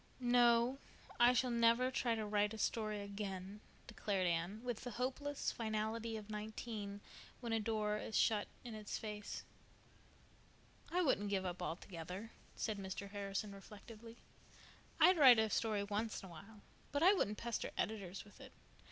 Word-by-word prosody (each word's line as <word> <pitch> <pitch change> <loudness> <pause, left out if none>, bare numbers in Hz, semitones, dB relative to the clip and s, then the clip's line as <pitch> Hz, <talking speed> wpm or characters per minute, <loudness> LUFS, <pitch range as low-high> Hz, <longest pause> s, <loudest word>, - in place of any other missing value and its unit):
"No, 240 +1 +4 0.4
I 240 +1 +8
shall 250 0 +2
never 235 +2 +4
try 240 -3 +1
to 220 -1 -2
write 210 +1 +1
a - - -7
story 215 -1 -1
again," 200 0 -5 0.2
declared 200 -5 -1
Anne, 175 +6 -1
with 245 -3 -3
the 250 - -4
hopeless 265 +4 -2
finality 220 0 -2
of 210 -2 -8
nineteen 210 -1 -5 0.4
when 235 -2 -3
a 225 - +2
door 210 -1 0
is 220 - -2
shut 210 -2 +3 0.2
in 240 -2 -7
its 215 -1 -4
face. 210 -1 -5 1.5
"I 360 +1 +2
wouldn't 205 - +2
give 195 -2 0
up 180 0 -3
altogether," 180 +4 -5 0.2
said 215 -3 -2
Mr. 195 +1 -5
Harrison 200 0 -3
reflectively. 220 +3 -11 0.8
"I'd 365 -2 +7
write 255 -5 +10
a 220 -1 +2
story 215 -3 +1
once 210 +2 -2
in 190 - -9
a - - -12
while, 200 +6 -12 0.3
but 285 +2 +1
I 375 +3 +8
wouldn't 210 - 0
pester 235 -1 -2
editors 195 -4 -3
with 205 - -16
it. - - -11
215 Hz, 160 wpm, -38 LUFS, 200-235 Hz, 1.5 s, write